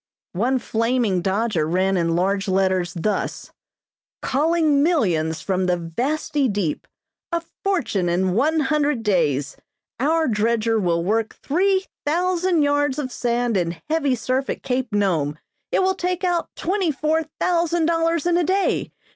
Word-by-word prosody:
One 240 Hz, +9 st, +1 dB
flaming 230 Hz, -5 st, 0 dB
dodger 195 Hz, -3 st, 0 dB
ran 185 Hz, +3 st, +1 dB
in 165 Hz, -2 st, +1 dB
large 195 Hz, +3 st, 0 dB
letters 185 Hz, -2 st, +1 dB
thus: 200 Hz, +4 st, -2 dB, 0.7 s
"Calling 305 Hz, 0 st, +2 dB
millions 175 Hz, -, +1 dB
from 185 Hz, -1 st, -1 dB
the 180 Hz, -1 st, +2 dB
vasty 265 Hz, -, -1 dB
deep. 200 Hz, -8 st, -2 dB, 0.4 s
A 335 Hz, -1 st, -1 dB, 0.2 s
fortune 265 Hz, -, 0 dB
in 180 Hz, +1 st, +1 dB
one 305 Hz, -, +2 dB
hundred 295 Hz, -3 st, 0 dB
days. 150 Hz, -9 st, 0 dB, 0.4 s
Our 320 Hz, +4 st, +2 dB
dredger 225 Hz, 0 st, +1 dB
will 170 Hz, -3 st, 0 dB
work 220 Hz, +4 st, 0 dB
three 380 Hz, +5 st, +1 dB, 0.2 s
thousand 350 Hz, +1 st, +1 dB
yards 290 Hz, -1 st, +1 dB
of 270 Hz, -4 st, -3 dB
sand 240 Hz, -1 st, 0 dB
in 170 Hz, -2 st, -1 dB
heavy 285 Hz, -5 st, +2 dB
surf 255 Hz, +3 st, -1 dB
at -, -, -4 dB
Cape 250 Hz, -2 st, -2 dB
Nome. 170 Hz, -8 st, 0 dB, 0.3 s
It -, -, +2 dB
will 380 Hz, 0 st, +2 dB
take 360 Hz, 0 st, -2 dB
out 350 Hz, -2 st, 0 dB
twenty 375 Hz, 0 st, 0 dB
four 310 Hz, +3 st, 0 dB, 0.2 s
thousand 340 Hz, -2 st, +1 dB
dollars 330 Hz, -1 st, +1 dB
in 350 Hz, -1 st, +3 dB
a 350 Hz, -, +2 dB
day. 380 Hz, +4 st, 0 dB
250 Hz, 145 wpm, -22 LUFS, -, 0.7 s, in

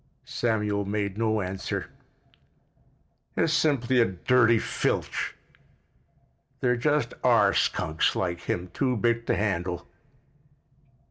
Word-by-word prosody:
Samuel 105 Hz, -3 st, -1 dB
made 100 Hz, -1 st, -2 dB
no 110 Hz, -2 st, +1 dB
answer. 95 Hz, +1 st, -4 dB, 1.5 s
"It's 160 Hz, -, +2 dB
simply 130 Hz, -6 st, +2 dB
a -, -, +5 dB
dirty 115 Hz, +5 st, +3 dB
filch. -, -, -2 dB, 1.2 s
There 125 Hz, -1 st, +2 dB
just 145 Hz, +4 st, 0 dB
are -, -, +5 dB
skunks 80 Hz, 0 st, +1 dB
like 85 Hz, -2 st, -2 dB
him 90 Hz, +1 st, -3 dB
too 130 Hz, -3 st, 0 dB
big 115 Hz, +1 st, 0 dB
to -, -, +2 dB
handle." 90 Hz, -4 st, -2 dB
110 Hz, 105 wpm, -26 LUFS, 95-125 Hz, 1.5 s, a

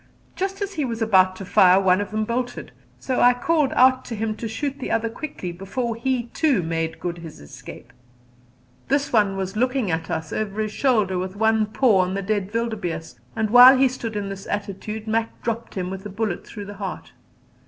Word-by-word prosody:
Just 390 Hz, +2 st, -2 dB
as 400 Hz, 0 st, -5 dB
he 310 Hz, -5 st, -2 dB
was 230 Hz, -3 st, -3 dB
about 190 Hz, -4 st, +4 dB
to 195 Hz, -, -8 dB
fire 185 Hz, +1 st, +5 dB
one 190 Hz, 0 st, +3 dB
of 205 Hz, -, -4 dB
them 215 Hz, 0 st, -1 dB
bolted, 245 Hz, +2 st, -3 dB, 0.3 s
so 260 Hz, -, -2 dB
I 245 Hz, 0 st, +6 dB
called 295 Hz, +2 st, +1 dB
out 255 Hz, 0 st, +4 dB
to 235 Hz, -, -5 dB
him 215 Hz, 0 st, -2 dB
to 230 Hz, -, -4 dB
shoot 275 Hz, +5 st, -4 dB
the -, -, -4 dB
other 225 Hz, 0 st, 0 dB
quickly 230 Hz, -, -6 dB
before 210 Hz, +7 st, -4 dB
he 250 Hz, +1 st, -1 dB
too 285 Hz, -, +2 dB
made 165 Hz, 0 st, -3 dB
good 175 Hz, -1 st, -4 dB
his 165 Hz, -2 st, -10 dB
escape. 70 Hz, -, -12 dB, 0.9 s
This 280 Hz, -1 st, 0 dB
one 205 Hz, -3 st, +3 dB
was 190 Hz, 0 st, -4 dB
looking 250 Hz, -3 st, 0 dB
at 160 Hz, 0 st, -2 dB
us 160 Hz, -1 st, -4 dB
over 210 Hz, -1 st, -3 dB
his 215 Hz, -1 st, -1 dB
shoulder 215 Hz, -8 st, +1 dB
with 185 Hz, +1 st, -4 dB
one 220 Hz, 0 st, +2 dB
paw 215 Hz, -2 st, +3 dB
on 185 Hz, +1 st, +1 dB
the 195 Hz, -, -3 dB
dead 205 Hz, -1 st, -1 dB
wildebeeste, 205 Hz, -, -3 dB, 0.2 s
and 215 Hz, -1 st, -1 dB
while 250 Hz, +2 st, +9 dB
he 265 Hz, +1 st, +5 dB
stood 240 Hz, -3 st, -5 dB
in 200 Hz, -1 st, -3 dB
this 195 Hz, 0 st, -8 dB
attitude 205 Hz, +2 st, -4 dB
Mac 225 Hz, +1 st, -1 dB
dropped 230 Hz, 0 st, -4 dB
him 185 Hz, -1 st, -3 dB
with 190 Hz, 0 st, -6 dB
a 210 Hz, -, -6 dB
bullet 205 Hz, -2 st, -3 dB
through 205 Hz, -2 st, -8 dB
the 205 Hz, 0 st, -9 dB
heart. 190 Hz, -2 st, -6 dB
215 Hz, 205 wpm, -23 LUFS, 190-245 Hz, 0.9 s, while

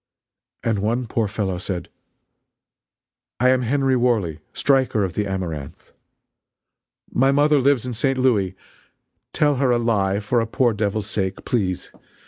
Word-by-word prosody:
And 115 Hz, -4 st, 0 dB
one 115 Hz, +5 st, 0 dB
poor 115 Hz, -1 st, -1 dB
fellow 100 Hz, -3 st, -2 dB
said: 90 Hz, -1 st, -4 dB, 1.5 s
"I 125 Hz, +2 st, +4 dB
am 130 Hz, 0 st, +3 dB
Henry 135 Hz, +2 st, +1 dB
Worley, 110 Hz, -11 st, +1 dB
striker 130 Hz, -6 st, +2 dB
of 95 Hz, -3 st, -2 dB
the 105 Hz, +2 st, -1 dB
Amaranth! 85 Hz, -7 st, -5 dB, 1.2 s
My 135 Hz, +2 st, +3 dB
mother 145 Hz, +1 st, +4 dB
lives 135 Hz, -2 st, +2 dB
in 125 Hz, -, -4 dB
St. 135 Hz, +4 st, 0 dB
Louis. 105 Hz, -8 st, +1 dB, 0.8 s
Tell 145 Hz, -2 st, +2 dB
her 135 Hz, -1 st, +2 dB
a 120 Hz, -, +3 dB
lie 100 Hz, -4 st, +1 dB
for 110 Hz, +3 st, 0 dB
a 115 Hz, -, -1 dB
poor 120 Hz, +1 st, +2 dB
devil's 105 Hz, 0 st, -1 dB
sake, 95 Hz, -3 st, -3 dB
please. 95 Hz, -8 st, -1 dB
115 Hz, 140 wpm, -22 LUFS, 100-130 Hz, 1.5 s, I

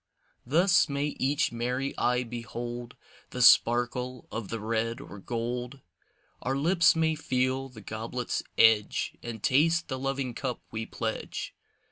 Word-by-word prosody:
Thus 175 Hz, +4 st, +4 dB
may 145 Hz, +1 st, -1 dB
each 140 Hz, +3 st, +1 dB
merry 125 Hz, +3 st, -2 dB
eye 125 Hz, +1 st, +1 dB
behold 120 Hz, 0 st, -6 dB, 0.3 s
The 125 Hz, -, -4 dB
sparkle 120 Hz, +1 st, +4 dB
of 110 Hz, -3 st, -5 dB
the 115 Hz, -, -3 dB
red 115 Hz, +1 st, -1 dB
or 100 Hz, -, -10 dB
gold. 120 Hz, +4 st, -4 dB, 0.6 s
Our 135 Hz, +1 st, -1 dB
lips 165 Hz, +4 st, +4 dB
may 160 Hz, -1 st, +2 dB
feel 130 Hz, -3 st, -1 dB
the 115 Hz, -4 st, -12 dB
goblet's 115 Hz, +4 st, -3 dB, 0.2 s
edge 110 Hz, -2 st, +4 dB
And 115 Hz, -3 st, -7 dB
taste 160 Hz, +5 st, +3 dB
the 130 Hz, -1 st, -3 dB
loving 135 Hz, -2 st, -2 dB
cup 125 Hz, 0 st, -4 dB
we 110 Hz, 0 st, -4 dB
pledge. -, -, -4 dB
125 Hz, 135 wpm, -28 LUFS, 115-135 Hz, 0.6 s, Thus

